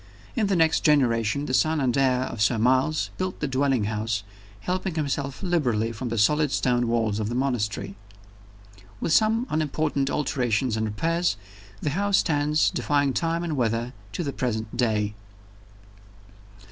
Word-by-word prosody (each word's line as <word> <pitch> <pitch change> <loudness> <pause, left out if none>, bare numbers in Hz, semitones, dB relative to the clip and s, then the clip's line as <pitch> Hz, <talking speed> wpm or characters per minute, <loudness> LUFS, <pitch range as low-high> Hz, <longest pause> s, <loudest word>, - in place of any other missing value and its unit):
In 220 -5 +1
the 195 - +1
next 160 -2 +3
generation, 125 -3 +2
the 130 - -3
son 155 +3 +2
and 130 -4 +1
heir 130 -2 +2
of 115 -4 -4
Sir 115 +2 +3
Miles 130 +6 +2
built 185 0 -3
the 150 - -1
dwelling 135 -3 +1
house, 105 -1 -2 0.4
helping 185 -1 -2
himself 140 -1 -2
liberally 125 - +1
from 120 +2 -5
the 115 - -2
solid 150 +7 +3
stone 120 -2 +1
walls 115 -3 0
of 105 0 -2
the 120 - -3
monastery. 105 -7 -1 1.1
With 165 - 0
some 225 +4 +3
unimportant 150 -2 0
alterations 125 -5 0
and 110 0 -1
repairs, 165 +6 0 0.5
the 145 - 0
house 200 +5 +2
stands, 150 -1 +2
defying 145 -2 +1
time 165 +2 -1
and 165 -3 -2
weather, 120 0 -1 0.2
to 175 - -2
the 140 -3 -3
present 110 -3 -3
day. 110 -4 0
135 Hz, 155 wpm, -25 LUFS, 115-155 Hz, 1.1 s, next